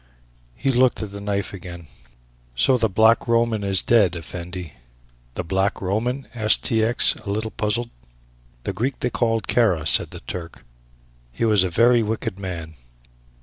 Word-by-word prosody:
He 135 - -1
looked 130 -2 +2
at 105 - -7
the 100 0 -8
knife 100 0 -2
again. 85 -2 -9 0.7
"So 95 - +3
the 115 -3 +1
Black 110 +4 +3
Roman 115 -2 +1
is 95 -1 +1
dead, 105 -7 +3
Effendi." 85 0 -7 0.6
"The 90 - -3
Black 95 +4 -1
Roman?" 120 +8 -2
asked 110 -2 +3
T. 110 -1 +1
X., 115 +2 +4
a 110 - -9
little 110 +2 -2
puzzled. 115 +3 -2 0.7
"The - - -3
Greek 125 +7 -2
they 125 - 0
call 115 -2 0
Kara," 95 -12 +1
said - - +3
the - - -10
Turk; 85 -2 -8 0.7
"he - - -2
was 105 -4 +4
a 95 - -1
very 115 +6 +4
wicked 110 -3 -3
man." 85 -4 -6
105 Hz, 160 wpm, -22 LUFS, 90-115 Hz, 0.7 s, X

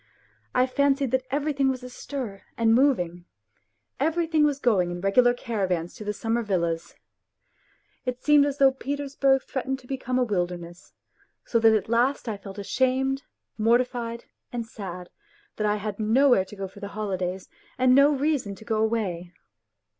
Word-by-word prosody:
I 250 0 +5
fancied 275 0 +1
that 260 0 0
everything 280 0 +1
was 255 -1 -3
astir 250 -4 -6 0.2
and 225 -1 +3
moving, 180 -10 +2 0.7
everything 320 +1 +2
was 290 -2 +2
going 200 -9 +2
in 175 0 -5
regular 220 +6 +4
caravans 185 -8 -2
to - - -9
the 210 - -2
summer 225 +3 -1
villas. 170 -6 -2 1.1
It 250 -1 -3
seemed 295 -1 +5
as 285 -1 -3
though 270 -1 +6
Petersburg 275 0 0
threatened 265 0 -3
to 255 - -18
become 255 -1 -2
a 255 - +3
wilderness, 175 -5 -4 0.5
so 230 - +1
that 225 -1 +5
at 215 - -1
last 240 +4 +1
I 220 - -2
felt 195 0 -10
ashamed, 260 +5 0 0.4
mortified 235 +1 +1 0.3
and 235 -2 -3
sad 180 -5 -8 0.5
that 215 - 0
I 210 - +2
had 210 0 -5
nowhere 230 -1 +4
to 210 - -12
go 195 -1 -4
for 195 +2 -14
the 200 - -5
holidays 190 -3 -3 0.3
and 255 0 +4
no 280 +2 +6
reason 280 -7 0
to 220 - -14
go 220 0 0
away. 210 -6 -1
235 Hz, 160 wpm, -26 LUFS, 200-265 Hz, 1.1 s, though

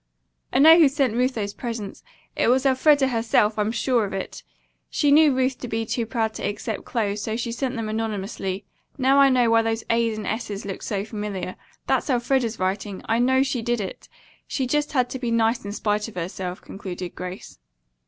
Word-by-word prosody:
"I - - +1
know 320 +5 +8
who 310 -4 +7
sent 270 -4 +1
Ruth 250 +2 +1
those 205 -2 -3
presents. 225 -5 -6 0.3
It - - +1
was 260 +3 +3
Elfreda 270 +1 +4
herself. 225 -2 +2
I'm 210 +1 +1
sure 235 +1 +1
of 200 - -4
it. 195 - -5 0.5
She 290 -2 +2
knew 305 0 +7
Ruth 260 0 0
to 245 - -6
be 225 0 -2
too 230 0 -2
proud 225 -2 -1
to - - -7
accept 205 +1 -3
clothes, 210 -3 -1
so 220 0 -2
she 235 0 -3
sent 255 +2 -2
them 225 -2 -3
anonymously. 205 -3 -3 0.3
Now 270 +1 +4
I 275 0 +7
know 245 -3 +3
why 230 0 +5
those 225 0 -1
'a's' 230 -1 +1
and 215 - -5
's's' 210 -2 -4
looked 195 -1 -6
so 200 -1 -2
familiar. 210 -4 -5 0.3
That's - - 0
Elfreda's 245 -2 +1
writing. 190 +1 -3
I 225 +1 +1
know 260 +2 +4
she 260 -3 -2
did 240 0 0
it. 195 -3 -6 0.4
She 265 - -1
just 295 +4 0
had 255 -3 +2
to 260 - -4
be 245 -2 -2
nice 230 0 +1
in 200 - -4
spite 210 0 -1
of 225 - -11
herself," 180 +1 -5
concluded 185 -2 -7
Grace. 180 - -8
225 Hz, 200 wpm, -24 LUFS, 205-255 Hz, 0.5 s, know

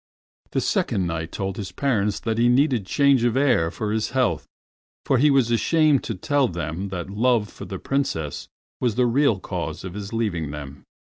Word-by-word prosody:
The - - +1
Second 95 - 0
Knight 85 -1 -3
told 95 -1 -4
his 100 -3 -5
parents 105 -7 0
that 110 0 -1
he 120 +1 +4
needed 125 -5 +2
change 140 -2 +3
of 120 +1 +2
air 130 -13 +3
for 105 +3 -4
his 110 0 -1
health, 130 -2 +1 0.6
for 130 - +2
he 150 +3 +5
was 135 -4 +3
ashamed 150 +3 +3
to 115 - -3
tell 140 +7 +1
them 85 +1 -4
that 90 0 -5
love 110 0 +2
for - - -9
the 95 - -6
Princess 90 - -2
Moonlight - - -57
was 105 - -5
the 125 - +3
real 120 -3 +2
cause - - -5
of 95 -2 -6
his 100 0 -6
leaving 100 -10 -1
them. 70 -1 -8
110 Hz, 195 wpm, -23 LUFS, 95-130 Hz, 0.6 s, he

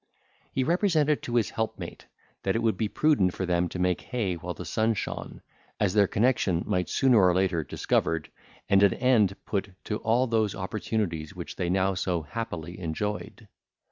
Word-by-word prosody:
He 130 - 0
represented 160 -2 +2
to 120 - -4
his 115 -4 +2
helpmate, 110 0 -4 0.3
that 95 - 0
it 115 - 0
would 110 -3 +2
be 110 +3 -1
prudent 105 - +2
for 95 - -2
them 90 0 +1
to - - -6
make 90 -1 +1
hay 110 -7 -2
while 85 0 -5
the 90 - -7
sun 110 +6 +1
shone, - - -5 0.4
as 100 -3 +2
their 100 -2 +5
connexion 105 -7 +1
might 90 0 0
be - - -8
sooner 130 -4 +4
or 90 -1 +4
later 90 -3 +1
discovered, 80 +2 -1 0.4
and 100 0 +4
an 100 -2 +5
end 110 -7 +3
put 100 -1 -2
to 105 - -2
all 115 +4 +2
those 110 -4 +1
opportunities 95 -5 -3
which - - -7
they 90 - -2
now 95 +1 +2
so 90 -2 -1
happily 85 -1 -5
enjoyed. 105 +6 -4
100 Hz, 180 wpm, -27 LUFS, 90-115 Hz, 0.4 s, their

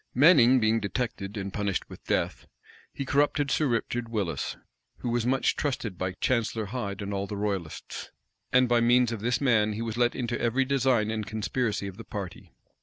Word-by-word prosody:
Manning 130 -3 +7
being 110 0 +3
detected, 105 -1 -3
and 100 -1 -4
punished 100 -2 -1
with - - -12
death, - - -1 0.4
he 140 - -5
corrupted 145 +1 +2
Sir 155 - +2
Richard 120 0 -1
Willis, 105 -6 -2 0.4
who 120 - -4
was 120 0 0
much 130 +1 +2
trusted 135 -8 -2
by 95 0 -1
Chancellor 115 +2 0
Hyde 100 -3 -4
and 100 0 -4
all 100 0 -2
the 105 - -5
royalists; 100 -6 -4 0.4
and 125 0 +5
by 120 -1 +3
means 120 0 +4
of 115 -3 -4
this 120 +2 +1
man 110 -6 +3
he 110 - -4
was 115 0 -4
let 120 0 +2
into 120 -1 -2
every 125 +3 +2
design 130 -5 +2
and 110 -1 -3
conspiracy 110 0 -1
of 95 -1 -7
the 115 - -8
party. 100 -7 -7
115 Hz, 185 wpm, -28 LUFS, 105-125 Hz, 0.4 s, Manning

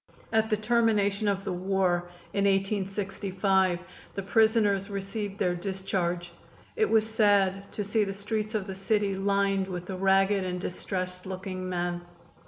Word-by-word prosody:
At 220 0 +3
the 215 - +2
termination 215 -2 +2
of 195 -1 0
the 190 - -2
war, 180 -1 0 0.2
in 200 0 +1
1865, 195 -1 +1 0.4
the 195 - -3
prisoners 210 -2 +3
received 200 0 -4
their 180 -3 +1
discharge. 175 -1 -2 0.4
It 435 -2 +2
was 220 -1 +3
sad 200 -3 +2
to 210 - -2
see 210 +2 +1
the 195 - -2
streets 215 +2 -3
of 205 -3 -1
the 195 - -5
city 200 +1 0
lined 195 0 +1
with 180 -2 -5
the 190 - -5
ragged 195 +1 +3
and 180 -1 -3
distressed 180 0 -4
looking 185 -1 -5
men. 175 -1 -2
195 Hz, 150 wpm, -28 LUFS, 185-205 Hz, 0.4 s, At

